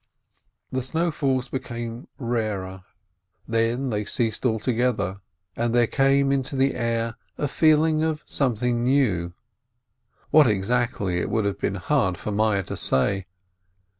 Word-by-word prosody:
The 130 Hz, -, -1 dB
snowfalls 140 Hz, -3 st, 0 dB
became 120 Hz, -1 st, -5 dB
rarer, 105 Hz, -7 st, -3 dB, 0.6 s
then 115 Hz, +3 st, 0 dB
they 105 Hz, -1 st, -1 dB
ceased 115 Hz, +2 st, 0 dB
alto 110 Hz, +2 st, 0 dB
gether, 115 Hz, -5 st, 0 dB, 0.3 s
and 120 Hz, 0 st, 0 dB
there 120 Hz, -1 st, +5 dB
came 135 Hz, +2 st, +2 dB
into 135 Hz, 0 st, -1 dB
the 135 Hz, +1 st, +2 dB
air 115 Hz, -1 st, -1 dB, 0.2 s
a 145 Hz, -, 0 dB
feeling 155 Hz, +1 st, +3 dB
of 160 Hz, -1 st, -1 dB
some 130 Hz, -5 st, 0 dB
thing 120 Hz, +1 st, 0 dB
new 110 Hz, -10 st, +1 dB, 0.5 s
— -, -, -42 dB
what 150 Hz, -3 st, +7 dB
exactly, 105 Hz, -3 st, 0 dB
it -, -, -2 dB
would 110 Hz, -2 st, 0 dB
have 100 Hz, -, -2 dB
been 100 Hz, -, -1 dB
hard 100 Hz, -3 st, +1 dB
for 105 Hz, -, -5 dB
Meyerl 105 Hz, -2 st, +1 dB
to -, -, -5 dB
say. 95 Hz, +8 st, 0 dB
120 Hz, 140 wpm, -24 LUFS, 105-135 Hz, 0.6 s, what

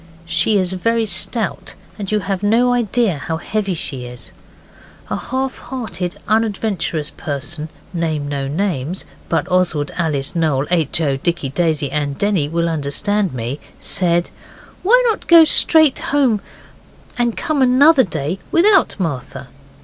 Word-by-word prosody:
She 175 Hz, +6 st, +2 dB
is 185 Hz, -1 st, 0 dB
very 230 Hz, +5 st, 0 dB
stout, 215 Hz, +2 st, -1 dB, 0.2 s
and 200 Hz, -1 st, -4 dB
you 210 Hz, -1 st, +1 dB
have 195 Hz, -1 st, -3 dB
no 235 Hz, +4 st, +3 dB
idea 230 Hz, -7 st, 0 dB
how 160 Hz, +4 st, -3 dB
heavy 195 Hz, +1 st, -2 dB
she 130 Hz, -5 st, -4 dB
is. 125 Hz, 0 st, -11 dB, 0.8 s
A -, -, +1 dB
half 260 Hz, +1 st, -3 dB
hearted 225 Hz, -8 st, -5 dB
unadventurous 205 Hz, -8 st, -1 dB
person 150 Hz, +2 st, -4 dB, 0.2 s
(I 175 Hz, -, -3 dB
name 155 Hz, -3 st, -1 dB
no 140 Hz, -1 st, -3 dB
names, 165 Hz, 0 st, -2 dB, 0.2 s
but 165 Hz, -, 0 dB
Oswald, 175 Hz, -5 st, +1 dB
Alice, 150 Hz, -3 st, -1 dB
Noel, 150 Hz, -5 st, +1 dB
H. 165 Hz, -1 st, +2 dB
O., 140 Hz, -4 st, 0 dB
Dicky, 170 Hz, -1 st, -1 dB
Daisy, 155 Hz, -2 st, 0 dB
and 145 Hz, -1 st, -1 dB
Denny 195 Hz, -8 st, +1 dB
will 170 Hz, +1 st, 0 dB
understand 170 Hz, +6 st, -1 dB
me) 125 Hz, +4 st, -4 dB, 0.2 s
said, 175 Hz, -1 st, +1 dB, 0.5 s
why 465 Hz, +7 st, +5 dB
not 445 Hz, -, -1 dB
go 335 Hz, -1 st, +9 dB
straight 315 Hz, -2 st, +4 dB
home 260 Hz, -8 st, +1 dB, 0.7 s
and 240 Hz, -2 st, -1 dB
come 305 Hz, -3 st, -1 dB
another 265 Hz, +3 st, +5 dB
day 160 Hz, -, -3 dB
without 380 Hz, -, +4 dB
Martha? 135 Hz, -5 st, -4 dB
180 Hz, 140 wpm, -18 LUFS, 150-225 Hz, 0.8 s, go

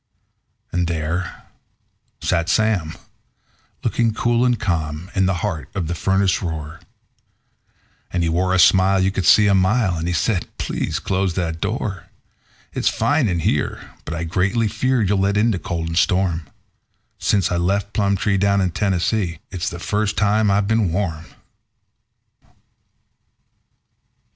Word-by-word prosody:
And 90 Hz, 0 st, 0 dB
there 85 Hz, +2 st, -3 dB, 0.8 s
sat 85 Hz, -1 st, 0 dB
Sam, 95 Hz, -7 st, +1 dB, 0.9 s
looking 115 Hz, -2 st, +1 dB
cool 120 Hz, +1 st, +1 dB
and 125 Hz, -2 st, +2 dB
calm, 85 Hz, -2 st, -2 dB
in 95 Hz, -2 st, +2 dB
the 95 Hz, -, +1 dB
heart 85 Hz, -8 st, -4 dB
of 95 Hz, -4 st, -1 dB
the 85 Hz, -, -2 dB
furnace 95 Hz, +2 st, +1 dB
roar; 80 Hz, -4 st, -5 dB, 1.3 s
And 90 Hz, -2 st, 0 dB
he -, -, +1 dB
wore 90 Hz, +3 st, +1 dB
a -, -, +3 dB
smile 95 Hz, +1 st, +5 dB
you 95 Hz, +1 st, +2 dB
could 95 Hz, -4 st, -1 dB
see 105 Hz, -, +7 dB
a 100 Hz, -, +4 dB
mile, 95 Hz, 0 st, +2 dB
and 80 Hz, +1 st, -3 dB
he 90 Hz, -, -1 dB
said: 100 Hz, -3 st, 0 dB
"Please -, -, -2 dB
close 95 Hz, -2 st, -1 dB
that 80 Hz, -3 st, -2 dB
door. 100 Hz, -2 st, -3 dB, 0.7 s
It's -, -, +1 dB
fine 145 Hz, -4 st, +1 dB
in 85 Hz, -4 st, -1 dB
here, -, -, -1 dB
but 80 Hz, -, -5 dB
I 85 Hz, -, -3 dB
greatly 100 Hz, +7 st, 0 dB
fear 120 Hz, +3 st, 0 dB
you'll 100 Hz, 0 st, +1 dB
let 100 Hz, +1 st, +1 dB
in 115 Hz, +3 st, +3 dB
the 95 Hz, -, -2 dB
cold 80 Hz, 0 st, -3 dB
and 80 Hz, -, -3 dB
storm 90 Hz, -6 st, +1 dB, 0.7 s
Since 95 Hz, -4 st, +1 dB
I 90 Hz, -, +1 dB
left 100 Hz, +4 st, 0 dB
Plumtree, 100 Hz, -1 st, +1 dB
down 100 Hz, 0 st, +2 dB
in 95 Hz, -2 st, +1 dB
Tennessee, 95 Hz, -1 st, 0 dB
it's 95 Hz, +2 st, -2 dB
the 85 Hz, -, -7 dB
first 105 Hz, +3 st, -1 dB
time 105 Hz, 0 st, +2 dB
I've 100 Hz, 0 st, +2 dB
been 110 Hz, -5 st, +1 dB
warm." 85 Hz, -3 st, -2 dB
95 Hz, 150 wpm, -21 LUFS, 85-105 Hz, 1.3 s, see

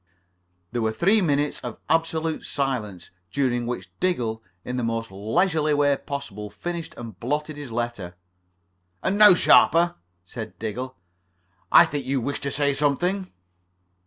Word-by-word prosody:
There 120 Hz, 0 st, -2 dB
were 110 Hz, 0 st, +1 dB
three 195 Hz, -, +3 dB
minutes 145 Hz, -4 st, +1 dB
of -, -, -7 dB
absolute 160 Hz, -1 st, 0 dB
silence 120 Hz, -, -3 dB, 0.2 s
during 120 Hz, -4 st, 0 dB
which 125 Hz, -, -5 dB
Diggle, 120 Hz, -12 st, 0 dB, 0.2 s
in 125 Hz, 0 st, -3 dB
the 125 Hz, -, -1 dB
most 115 Hz, -2 st, -2 dB
leisurely 150 Hz, -, +1 dB
way 145 Hz, -1 st, +3 dB
possible, 125 Hz, -8 st, -6 dB
finished 165 Hz, +11 st, -6 dB
and 115 Hz, -6 st, -9 dB
blotted 150 Hz, -, -2 dB
his 145 Hz, -4 st, -8 dB
letter. 115 Hz, -6 st, -4 dB, 0.9 s
"And 190 Hz, -, +1 dB
now, 210 Hz, -4 st, +9 dB
Sharper," 170 Hz, 0 st, +5 dB, 0.3 s
said 110 Hz, +4 st, -8 dB
Diggle, 125 Hz, +4 st, -5 dB, 0.8 s
"I 170 Hz, -, +9 dB
think 145 Hz, -5 st, -4 dB
you 135 Hz, 0 st, +1 dB
wished 140 Hz, +4 st, -3 dB
to 140 Hz, -, -2 dB
say 140 Hz, -1 st, +1 dB
something." 175 Hz, +7 st, 0 dB
140 Hz, 140 wpm, -24 LUFS, 115-160 Hz, 0.9 s, now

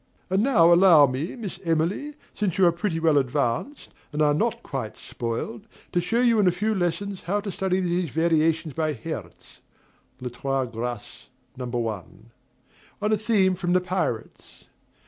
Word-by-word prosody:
And 190 Hz, +2 st, +3 dB
now 175 Hz, -10 st, +5 dB
allow 170 Hz, -4 st, +7 dB
me, 135 Hz, +7 st, -3 dB
Miss 205 Hz, -7 st, -6 dB
Emily, 170 Hz, -, -1 dB, 0.2 s
since 200 Hz, -5 st, -2 dB
you 190 Hz, -, +5 dB
are 170 Hz, -, +6 dB
pretty 170 Hz, -1 st, -2 dB
well 160 Hz, -3 st, +4 dB
advanced, 125 Hz, -, -2 dB, 0.2 s
and 150 Hz, -, -4 dB
are 150 Hz, -1 st, +4 dB
not 150 Hz, -, -1 dB
quite -, -, -5 dB
spoiled, 120 Hz, -, -5 dB, 0.2 s
to 175 Hz, -, +1 dB
show 225 Hz, +8 st, 0 dB
you 235 Hz, -3 st, +4 dB
in 200 Hz, -, +4 dB
a -, -, +5 dB
few 210 Hz, +5 st, -1 dB
lessons 190 Hz, +1 st, -2 dB
how 200 Hz, +4 st, 0 dB
to 200 Hz, -1 st, -5 dB
study 190 Hz, -1 st, 0 dB
these 175 Hz, -2 st, 0 dB
variations 160 Hz, 0 st, +1 dB
by 155 Hz, 0 st, -1 dB
Herz 115 Hz, -, -8 dB, 0.6 s
(Les 125 Hz, -1 st, -5 dB
Trois 135 Hz, +2 st, -1 dB
Graces, 120 Hz, -1 st, -6 dB, 0.3 s
No. 125 Hz, -1 st, -5 dB
1, 115 Hz, -2 st, -5 dB, 0.7 s
on 210 Hz, +1 st, 0 dB
a -, -, +5 dB
theme 205 Hz, -3 st, +2 dB
from 175 Hz, -1 st, -1 dB
"The 185 Hz, -, +4 dB
Pirates"). 180 Hz, -11 st, -4 dB
170 Hz, 165 wpm, -25 LUFS, 140-195 Hz, 0.7 s, allow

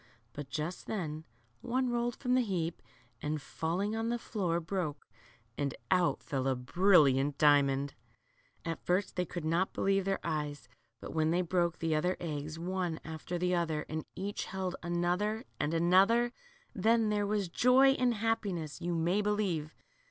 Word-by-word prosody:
But 145 Hz, -2 st, -7 dB
just 165 Hz, +3 st, -4 dB
then 160 Hz, -7 st, -3 dB, 0.4 s
one 255 Hz, +1 st, 0 dB
rolled 240 Hz, 0 st, 0 dB
from 250 Hz, -2 st, -1 dB
the 255 Hz, -, +5 dB
heap 175 Hz, -7 st, -2 dB, 0.4 s
and, 150 Hz, +1 st, -2 dB
falling 180 Hz, +9 st, -2 dB
on 225 Hz, +1 st, -1 dB
the 240 Hz, -, 0 dB
floor, 180 Hz, -7 st, -1 dB
broke, 160 Hz, -4 st, -3 dB, 0.5 s
and 140 Hz, -3 st, -1 dB, 0.2 s
out 180 Hz, -2 st, +2 dB
fell 135 Hz, -2 st, -2 dB
a 135 Hz, -, +2 dB
brilliant 145 Hz, -1 st, +4 dB
diamond! 140 Hz, -2 st, +4 dB, 0.7 s
At 165 Hz, -1 st, -4 dB
first 185 Hz, +3 st, 0 dB
they 180 Hz, -, 0 dB
could 170 Hz, -1 st, -5 dB
not 170 Hz, +4 st, +1 dB
believe 195 Hz, 0 st, +1 dB
their 195 Hz, 0 st, +1 dB
eyes, 150 Hz, -5 st, -3 dB, 0.3 s
but -, -, -7 dB
when 160 Hz, 0 st, +2 dB
they 175 Hz, +2 st, +2 dB
broke 175 Hz, -1 st, 0 dB
the 165 Hz, -1 st, 0 dB
other 180 Hz, +4 st, +1 dB
eggs, 155 Hz, -1 st, -4 dB
one 175 Hz, -1 st, -2 dB
after 160 Hz, +2 st, -5 dB
the 180 Hz, +1 st, +1 dB
other, 160 Hz, -3 st, 0 dB
and 155 Hz, 0 st, -3 dB
each 200 Hz, +2 st, -3 dB
held 190 Hz, -1 st, -3 dB
another 175 Hz, +6 st, 0 dB, 0.2 s
and 145 Hz, -, 0 dB
another, 195 Hz, +9 st, +4 dB, 0.4 s
then 225 Hz, 0 st, +3 dB
there 205 Hz, -1 st, +1 dB
was 205 Hz, -2 st, 0 dB
joy 250 Hz, +9 st, +5 dB
and 250 Hz, -3 st, +2 dB
happiness, 200 Hz, -8 st, -2 dB
you 175 Hz, 0 st, -1 dB
may 175 Hz, +5 st, +2 dB
belie 210 Hz, 0 st, +1 dB
v 190 Hz, -7 st, 0 dB
e. -, -, -15 dB
175 Hz, 165 wpm, -32 LUFS, 155-205 Hz, 0.7 s, the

